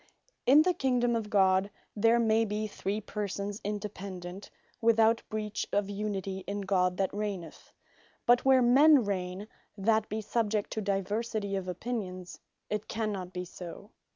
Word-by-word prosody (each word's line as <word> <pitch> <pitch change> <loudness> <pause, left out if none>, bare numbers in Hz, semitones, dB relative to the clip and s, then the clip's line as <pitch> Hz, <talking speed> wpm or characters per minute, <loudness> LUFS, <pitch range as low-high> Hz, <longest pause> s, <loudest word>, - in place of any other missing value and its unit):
In 290 +4 +8
the 365 +1 +2
Kingdome 250 -6 +1
of 220 -2 -2
God, 190 -1 +3 0.3
there 225 +2 +4
may 225 -1 +3
be 215 0 -2
three 205 0 -3
Persons 205 -1 -4
independent, 195 -2 -6 0.3
without 225 0 +4
breach 215 -1 -3
of 205 0 0
unity 200 -2 -3
in 205 0 -3
God 180 -2 +1
that 195 -1 0
Reigneth; 200 -6 -5 0.5
but 240 0 +5
where 265 -1 +5
men 270 +1 +6
Reigne, 185 0 -3 0.3
that 220 +2 +2
be 215 - -2
subject 215 -1 -1
to 220 - -2
diversity 200 +1 -1
of 190 -1 -3
opinions, 185 -2 -5 0.3
it 210 0 -3
cannot 205 -5 -3
be 180 -1 -5
so. 180 +4 -10
205 Hz, 145 wpm, -30 LUFS, 195-225 Hz, 0.5 s, In